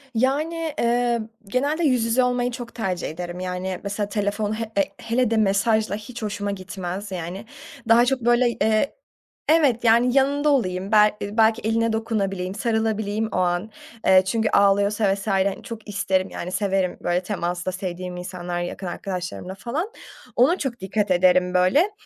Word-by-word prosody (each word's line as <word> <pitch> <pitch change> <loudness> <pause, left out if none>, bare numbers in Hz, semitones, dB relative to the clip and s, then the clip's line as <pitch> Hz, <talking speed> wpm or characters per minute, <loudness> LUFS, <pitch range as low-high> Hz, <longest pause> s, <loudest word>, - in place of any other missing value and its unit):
Yani, 305 +6 0
eee, 235 0 +2 0.3
genelde 285 +9 0
yüz 255 -6 +3
yüze 230 +3 +2
olmayı 245 0 0
çok 240 -1 -8
tercih 190 -6 -2
ederim. 175 +2 -6
Yani, 185 0 -3
mesela 205 0 -3
telefon 205 0 -1
he 225 - -3
e 195 - +5 0.2
hele 235 0 0
de 225 - +2
mesajla 215 +1 +2
hiç 225 +3 -8
hoşuma 205 -1 -2
gitmez 190 +1 -6
yani. 180 +3 -5 0.4
Daha 235 +1 +6
çok 255 0 0
böyle, 240 +1 +4
eee 220 +3 +1 0.6
Evet, 280 -8 +3
yani, 240 +3 +4
yanında 285 +2 +3
olayım, 190 -8 0
bel 210 -1 +6
eee, 205 +2 -5
belki 225 +1 +4
eline 225 +1 +1
dokunabileyim, 195 -4 -2
sarılabileyim 220 -1 0
o - - -2
an. 180 +4 0 0.4
Eee, 190 0 +7
çünkü 220 +3 0
ağlıyorsa 200 +1 +3
vs. 195 +2 -6
hani, 195 -1 +1
çok 225 -4 -8
isterim 190 -2 0
yani, 180 - -6
severim 190 -1 0
böyle 175 +1 0
temasta, 180 -2 -2
sevdiğim 180 -1 -5
insanlar 180 -1 -4
yakın 175 +1 -5
arkadaşlarımla 180 0 -5
falan. 285 - -3 0.4
Ona 280 +9 +4
çok 260 -7 -4
dikkat 200 +1 -1
ederim 180 0 +4
böyle. 185 - +3
210 Hz, 160 wpm, -23 LUFS, 185-235 Hz, 0.6 s, Eee